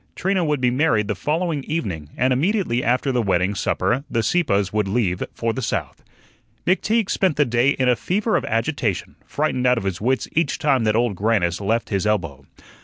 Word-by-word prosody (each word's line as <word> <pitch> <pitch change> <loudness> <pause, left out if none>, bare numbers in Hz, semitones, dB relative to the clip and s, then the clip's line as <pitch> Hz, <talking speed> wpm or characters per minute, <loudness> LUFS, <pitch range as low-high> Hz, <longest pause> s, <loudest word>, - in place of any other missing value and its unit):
Trina 190 0 0
would 150 -3 0
be 125 -1 +2
married 125 -6 +2
the 105 - 0
following 155 - -1
evening, 95 - -3
and 130 +1 +2
immediately 155 - 0
after 125 +3 +1
the 125 -2 +1
wedding 95 -1 +1
supper 125 +6 0
the 115 - 0
Sieppes 105 - +1
would 105 -2 +1
leave 95 -4 0
for 115 -1 -1
the 130 - -4
South. - - -3 0.6
McTeague 210 +4 +1
spent 185 -6 +1
the 145 +1 +3
day 120 +2 +2
in 130 - +1
a 125 - +4
fever 205 - -1
of - - +1
agitation, 115 - -2
frightened 130 -4 0
out 125 0 +4
of 115 - -2
his 95 -2 -3
wits 130 +4 0
each 165 +2 0
time 140 -7 +1
that 110 0 +2
Old 115 -3 +1
Grannis 100 -3 0
left 115 +4 -1
his 100 0 0
elbow. 80 -10 -2
120 Hz, 195 wpm, -22 LUFS, 105-150 Hz, 0.6 s, a